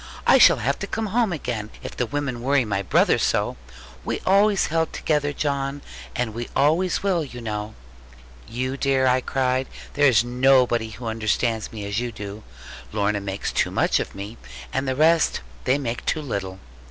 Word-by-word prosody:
I - - +6
shall - - +7
have - - -1
to - - -4
come 220 0 -2
home 220 0 +1
again, 120 -9 -4
if - - -7
the 125 - -1
women 140 -3 -3
worry 135 0 +2
my 100 -2 -1
brother 95 - +3
so. - - +1 0.5
We - - -2
always 200 +1 +4
held 160 0 0
together, 150 -2 0
John; 140 -1 -2 0.3
and 125 -4 -1
we 120 +1 -5
always 165 +8 +2
will, 185 -5 +1
you 125 -4 -8
know.' 105 -2 -5 0.7
'You 130 +3 -3
dear,' 135 -1 +2
I 130 0 +3
cried, 130 0 0 0.3
'there 145 +1 +4
is 115 -4 +5
nobody 125 -2 +3
who 110 +3 -9
understands 110 0 -1
me 105 -3 -6
as 100 +2 -1
you 120 0 -3
do. 105 -1 -8 0.5
Lorna 105 -1 0
makes 100 0 -3
too - - +1
much - - +2
of - - -5
me, 100 +4 -7 0.4
and 135 +1 -1
the 130 - 0
rest 160 +3 +3 0.2
they 130 - +3
make 120 -4 -4
too 155 - -1
little.' 95 -8 -4
125 Hz, 180 wpm, -23 LUFS, 110-145 Hz, 0.7 s, shall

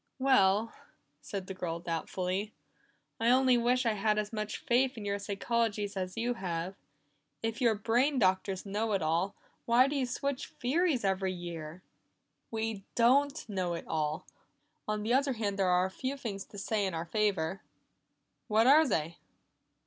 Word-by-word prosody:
"Well," 225 -5 +3 0.5
said 195 -2 -5
the 190 - -6
girl 170 -3 -4
doubtfully, 180 +4 -3 0.6
"I 230 +1 +2
only 255 0 +5
wish 245 +1 +2
I 225 - +3
had 210 +1 +1
as 210 +1 -2
much 215 -1 -3
faith 260 -2 +1
in 210 - -6
your 200 0 -1
psychologies 205 0 -1
as 185 +1 -4
you 240 +2 0
have. 180 -4 -3 0.7
If 225 +3 -2
you 235 -2 +5
brain 245 +7 +2
doctors 190 -2 +1
know 210 +2 -1
it 195 -4 +1
all, 170 +5 0 0.3
why 240 +3 +5
do 290 - -2
you 265 -3 0
switch 280 +2 -3
theories 280 - +1
every 190 -1 0
year?" 170 -1 -7 0.7
"We 220 -3 -3
don't 275 +5 +3
know 185 -4 -2
it 170 - -7
all. 155 -1 -2 0.6
On 215 0 -1
the 230 +3 +1
other 275 +1 +3
hand, 205 -4 -2
there 190 -2 +3
are 180 0 +4
a 190 - -4
few 265 +7 -4
things 205 -7 -5
to - - -29
be - - -8
said 215 +2 -1
in 195 -3 0
our 165 +1 -3
favor." 195 -2 0 0.9
"What 220 0 +3
are 300 +4 +7
they?" 165 -6 -1
210 Hz, 170 wpm, -31 LUFS, 190-245 Hz, 0.9 s, are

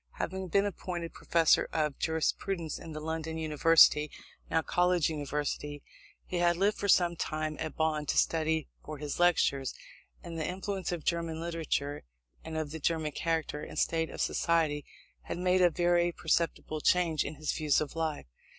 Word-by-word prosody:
Having 190 +1 -4
been 200 +4 +2
appointed 175 -3 -4
Professor 165 -2 +3
of 150 -3 -1
Jurisprudence 160 +1 -1
in 165 - -9
the 155 - -5
London 160 +1 -4
University 155 -1 +5 0.4
(now 160 0 +1
University 150 -4 0
College), - - -33 0.4
he 180 - -3
had 175 0 +3
lived 205 +3 +2
for 200 - -1
some 175 -3 +4
time 155 -1 -2
at 155 - -4
Bonn 155 -2 0
to - - 0
study 160 -1 +1 0.2
for 155 0 -7
his 145 +2 -5
Lectures; 140 -6 +2 0.5
and 165 -1 -6
the 155 - -1
influences 190 +1 -3
of 170 -3 -5
German 165 -1 -1
literature 160 -4 -2 0.4
and 160 0 -5
of 155 -2 -3
the 160 - -5
German 160 0 0
character 160 -1 -2
and - - -8
state 160 -1 +1
of - - -9
society 160 -3 +1 0.4
had - - -4
made 180 +1 +2
a 175 - +6
very 175 +1 +2
perceptible 160 -2 -1
change 170 -3 +3
in 150 - -6
his 155 +1 -2
views 150 -3 +2
of 155 0 -4
life. 160 - -2
160 Hz, 170 wpm, -30 LUFS, 155-175 Hz, 0.5 s, a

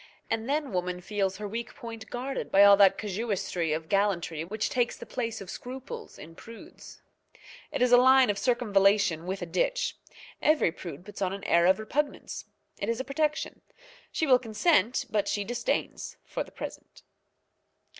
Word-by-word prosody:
And 225 +2 -1
then 290 -2 0
woman 180 -1 -2
feels 195 0 -2
her 210 0 -5
weak 230 +3 -5
point 225 -1 -9
guarded 265 +3 -4
by 195 +1 +7
all 200 0 +9
that 195 -2 +6
casuistry 195 -5 -2
of 160 +1 -2
gallantry 185 -5 0
which 215 +5 -2
takes 245 -1 0
the - - -9
place 230 -4 -4
of 190 - -9
scruples 260 +2 -8
in 160 +3 -11
prudes. 230 +6 -13 0.7
It - - +1
is 250 - +3
a 245 - +9
line 260 -3 +6
of 200 - -5
circumvallation 200 -7 +2
with 190 0 -3
a - - -2
ditch. - - -1 0.4
Every 305 - +3
prude 170 -1 -9
puts 205 - -10
on 190 -1 0
an 200 - -7
air 170 +1 +4
of 190 - +5
repugnance. 275 +7 -3 0.3
It - - -2
is 230 +1 -1
a - - -1
protection. 305 +2 -1 0.5
She 325 - 0
will 255 -4 +5
consent, 230 - +2
but 205 -2 +1
she 205 - 0
disdains 240 +4 -3
for - - -3
the - - -17
present. - - -9
210 Hz, 175 wpm, -28 LUFS, 190-250 Hz, 0.7 s, all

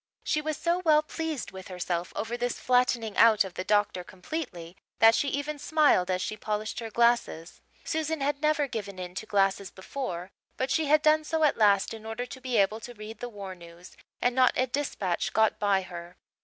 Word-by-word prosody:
She 300 - 0
was 310 -1 -3
so 345 +1 0
well 305 -2 +5
pleased 315 -3 -4
with 190 -1 -10
herself 180 -1 -3
over 225 +2 -3
this 245 0 -2
flattening 245 -3 +1
out 220 -2 +6
of 190 -2 -8
the 185 - -4
doctor 205 -3 +1
completely 180 - -7 0.2
that 225 0 +7
she 285 - +1
even 285 +2 -3
smiled 290 - +3
as 185 0 0
she 215 - -3
polished 215 +1 -3
her 230 -1 -5
glasses. 235 -7 +1 0.2
Susan 315 0 -2
had 280 +1 -1
never 305 -1 +2
given 205 -6 -6
in 180 -1 -6
to 220 +4 -6
glasses 195 -1 +1
before, 190 -4 -6 0.3
but 260 0 -1
she 315 +2 +2
had 305 +1 +4
done 310 0 +4
so 320 +1 -1
at 300 - +4
last 205 -2 +3
in 220 -1 -9
order 225 +2 -4
to 260 +1 -10
be 250 -2 -1
able 210 +2 +2
to 245 +1 -10
read 215 +1 -9
the 245 - -5
war 200 -4 -7
news 170 0 -14 0.3
and 245 - +3
not 255 0 +4
a 255 - +2
dispatch 245 -9 -2
got 220 0 +2
by 200 -2 +2
her. 175 0 -9
225 Hz, 205 wpm, -28 LUFS, 190-280 Hz, 0.3 s, that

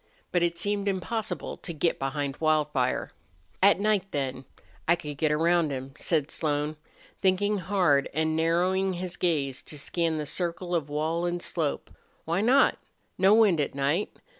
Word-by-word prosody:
But 175 - +2
it 170 0 +1
seemed 205 0 -1
impossible 205 +3 -2
to 170 - -7
get 165 +2 0
behind 135 +1 -2
Wildfire. 150 -5 +1 0.5
"At 200 0 +6
night 210 -2 +2
then 135 -3 -3 0.4
I 170 - +5
could 150 -4 -7
get 155 +2 +1
round 165 +1 +3
him," 135 -1 -5
said 155 -2 0
Slone, 150 -1 -1 0.5
thinking 205 +2 +2
hard 180 -7 +2
and 160 +1 0
narrowing 180 +4 +1
his 180 0 -4
gaze 145 -7 0
to 150 - -7
scan 165 +2 -1
the 150 - -3
circle 175 +3 -3
of 160 -4 0
wall 160 +4 -1
and 175 0 -2
slope. 160 -4 -2 0.3
"Why 170 +4 0
not?... 255 +6 +4 0.4
No 195 +3 +6
wind 205 -8 +4
at 140 - -3
night. 145 +8 0
165 Hz, 160 wpm, -27 LUFS, 150-185 Hz, 0.5 s, At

